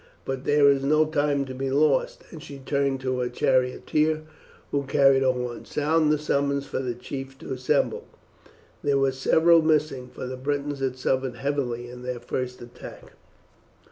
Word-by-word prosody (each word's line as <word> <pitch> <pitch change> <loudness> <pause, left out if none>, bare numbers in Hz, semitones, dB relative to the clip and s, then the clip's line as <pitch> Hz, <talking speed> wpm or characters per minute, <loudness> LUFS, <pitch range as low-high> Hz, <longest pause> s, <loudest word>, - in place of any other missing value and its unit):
But 135 0 -4
there 145 -1 +5
is 140 -1 +4
no 155 +3 +4
time 145 -2 0
to 130 - -7
be 135 +1 -3
lost;" 140 0 +1
and 160 - -9
she 140 -1 -9
turned 135 0 -1
to 130 -1 -1
her 125 0 -1
charioteer, 135 +5 +1 0.5
who 140 - +1
carried 135 -1 +4
a 130 -1 +4
horn. 125 -1 -5
"Sound 155 +1 +1
the 150 - +3
summons 140 -1 0
for - - -4
the 125 -2 -3
chiefs 135 +2 -7
to 135 - -7
assemble." 130 0 0 0.8
There 140 -1 +2
were 135 0 +2
several 160 +5 +4
missing, 150 -5 +1
for - - -7
the 130 0 -5
Britons 145 +1 -2
had 130 -1 -2
suffered 130 -1 -1
heavily 125 -3 -2
in 125 0 -10
their 125 -1 -4
first 125 +1 -4
attack. 120 0 -12
135 Hz, 170 wpm, -25 LUFS, 130-145 Hz, 0.8 s, there